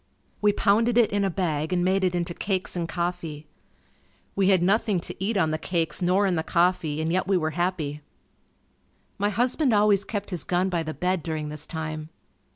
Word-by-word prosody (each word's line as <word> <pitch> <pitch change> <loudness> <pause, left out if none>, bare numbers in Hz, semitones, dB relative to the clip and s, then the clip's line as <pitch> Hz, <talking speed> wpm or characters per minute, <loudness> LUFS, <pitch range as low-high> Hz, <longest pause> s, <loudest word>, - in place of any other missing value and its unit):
We 210 0 +5
pounded 225 +4 +2
it 235 -3 +4
in 205 0 +1
a 195 - +1
bag 160 -4 -1
and 180 -1 +1
made 190 +1 +2
it 180 -1 +1
into 170 0 -2
cakes 190 0 -2
and 170 -1 -2
coffee. 170 -4 -3 0.9
We 195 -1 +3
had 185 -3 +4
nothing 205 0 +2
to 175 - -5
eat 210 +2 0
on 160 -4 +2
the 155 - -2
cakes 170 -1 -1
nor 185 +3 +3
in 190 - +1
the 160 - 0
coffee 170 -3 +1
and 160 +1 -1
yet 185 +2 0
we 195 -1 +3
were 155 -2 -1
happy. 165 -4 -2 1.2
My 205 +1 +2
husband 245 - +1
always 205 -1 +4
kept 205 -1 -5
his 175 -5 -3
gun 180 +1 0
by 175 -2 0
the 155 -1 -5
bed 180 0 0
during 155 -1 -4
this 150 0 -6
time. 155 -1 -5
180 Hz, 200 wpm, -25 LUFS, 160-200 Hz, 1.2 s, We